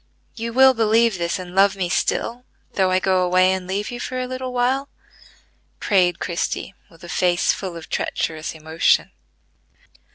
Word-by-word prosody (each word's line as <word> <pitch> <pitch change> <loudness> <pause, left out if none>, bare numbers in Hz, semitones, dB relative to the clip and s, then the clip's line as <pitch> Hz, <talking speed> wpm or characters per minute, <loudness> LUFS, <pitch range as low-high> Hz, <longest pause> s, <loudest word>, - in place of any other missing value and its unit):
You 230 0 -5
will 265 +2 +6
believe 225 -3 +2
this 170 0 -1
and 180 -1 -9
love 195 +1 +4
me 185 -2 -2
still, 230 +6 -1 0.3
though 190 -1 +2
I 185 - +2
go 185 0 +1
away 185 +1 +3
and 185 -1 -4
leave 200 +4 -3
you 245 - -6
for 255 +1 -4
a 255 - -2
little 255 0 -5
while?" 255 +3 0 0.9
prayed 180 -4 +2
Christie, 175 +2 -3 0.2
with 165 0 -19
a - - -9
face 175 0 +1
full 185 -4 -6
of 165 - -10
treacherous 155 0 -3
emotion. 160 +1 +1
190 Hz, 165 wpm, -21 LUFS, 175-235 Hz, 0.9 s, will